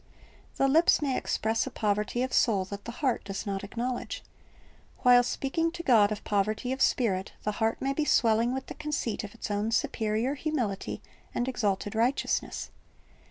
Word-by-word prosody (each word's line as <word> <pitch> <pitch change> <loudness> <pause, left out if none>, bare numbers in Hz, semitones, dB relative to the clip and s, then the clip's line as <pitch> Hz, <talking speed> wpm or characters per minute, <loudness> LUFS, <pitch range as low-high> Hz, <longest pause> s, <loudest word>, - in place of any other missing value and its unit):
"' - - -29
The 270 - +3
lips 320 +5 +5
may 275 -4 0
express 225 -2 0
a - - -2
poverty 210 +3 0
of 260 - -3
soul 200 -6 +3
that 200 +1 -8
the 235 - -4
heart 255 - +1
does 195 -1 -5
not 195 -1 -3
acknowledge. 240 +5 -4 0.8
While 245 -1 +7
speaking 275 +6 -1
to 345 -1 -6
God 220 -8 +5
of 215 - -4
poverty 210 +4 0
of 265 0 -3
spirit, 195 -6 +1
the 210 - 0
heart 225 0 +1
may 275 +1 0
be 305 - 0
swelling 230 -4 +3
with 265 0 -3
the - - -7
conceit 300 -7 -3
of 210 +1 -8
its 225 - -5
own 205 +2 0
superior 230 -1 0
humility 265 -10 -3 0.3
and 245 - 0
exalted 205 -5 -1
righteousness. 235 +5 0
230 Hz, 175 wpm, -28 LUFS, 210-265 Hz, 0.8 s, While